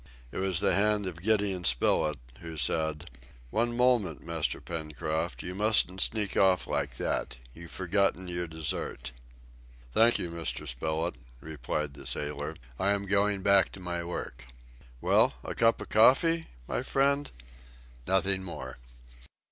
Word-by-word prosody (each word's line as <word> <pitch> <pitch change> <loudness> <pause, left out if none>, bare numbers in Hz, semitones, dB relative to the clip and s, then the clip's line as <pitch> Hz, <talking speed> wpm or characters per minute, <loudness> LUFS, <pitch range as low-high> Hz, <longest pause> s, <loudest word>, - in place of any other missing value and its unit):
It - - -7
was 95 -3 +2
the - - +3
hand 105 0 +2
of 85 -2 -6
Gideon 100 -3 +2
Spilett, 75 +3 +2 0.2
who 80 -1 -8
said, 80 +1 0 0.4
"One 120 +1 0
moment, 120 - +2
Master 85 -2 -1
Pencroft, 80 0 -4
you 90 - -4
mustn't 100 -2 +1
sneak 105 -3 +1
off 95 -1 +3
like - - -2
that! - - -2 0.2
You've 85 +2 -11
forgotten 95 0 0
your 90 0 -2
dessert." 80 -5 -4 0.8
"Thank 115 - +5
you, 85 - -4
Mr. 85 -2 -4
Spilett," 80 +6 -2 0.3
replied 75 0 -4
the - - -8
sailor, 75 +1 -3 0.2
"I 100 +2 +3
am 100 0 -2
going 100 0 +1
back 100 -1 +4
to - - -10
my 85 -1 -4
work." - - -6 0.5
"Well, - - +3
a - - -4
cup 115 0 +3
of - - -8
coffee, 160 +9 +5 0.2
my - - -1
friend?" 140 +1 +1 0.8
"Nothing 95 +1 +2
more." 65 -8 -7
90 Hz, 140 wpm, -29 LUFS, 80-100 Hz, 0.8 s, Thank